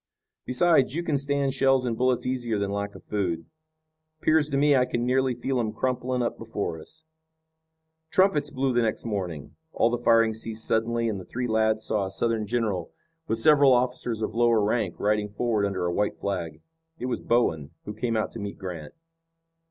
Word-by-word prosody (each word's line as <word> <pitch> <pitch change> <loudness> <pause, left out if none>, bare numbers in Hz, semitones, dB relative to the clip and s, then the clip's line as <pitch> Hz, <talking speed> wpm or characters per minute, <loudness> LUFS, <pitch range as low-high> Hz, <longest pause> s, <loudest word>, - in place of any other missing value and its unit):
Besides, 135 0 +3
you 170 - -1
can 150 -5 0
stand 140 -1 0
shells 135 -1 +3
and 120 -2 -1
bullets 125 +1 +1
easier 120 -4 -1
than 100 -1 -1
lack 100 0 -3
of - - -12
food. 90 -6 -2 0.7
'Pears 155 -1 +2
to 140 - 0
me 145 0 +4
I 125 - +4
can 120 -1 -2
nearly 130 0 +1
feel 130 +2 -1
'em 110 -2 -1
crumpling 125 +1 -1
up 120 - -3
before 105 -7 -4
us." 160 - -13 1.1
Trumpets 165 -7 +3
blew 130 -1 -1
the 120 - +3
next 110 0 -1
morning. 90 -9 -4 0.2
All 115 - +2
the 120 - -1
firing 115 -2 +4
ceased 110 0 -4
suddenly 115 +1 +1
and 105 -3 -2
the - - -8
three 125 +1 -3
lads 110 -1 +1
saw 105 -3 0
a - - -8
Southern 110 +1 -1
general 105 -7 -1 0.4
with 115 - 0
several 140 +2 +6
officers 125 -2 0
of 110 - -2
lower 115 -2 +3
rank, 105 -4 -1
riding 105 0 +1
forward 105 -1 0
under 95 -2 -2
a 85 - 0
white 105 +2 0
flag. 90 -5 -4 0.4
It 125 - -5
was 125 - -2
Bowen, 80 -12 +1 0.2
who 105 - -5
came 115 +1 -1
out 110 - -1
to 115 - -8
meet 100 -1 -5
Grant. 90 -6 -7
115 Hz, 190 wpm, -26 LUFS, 105-130 Hz, 1.1 s, several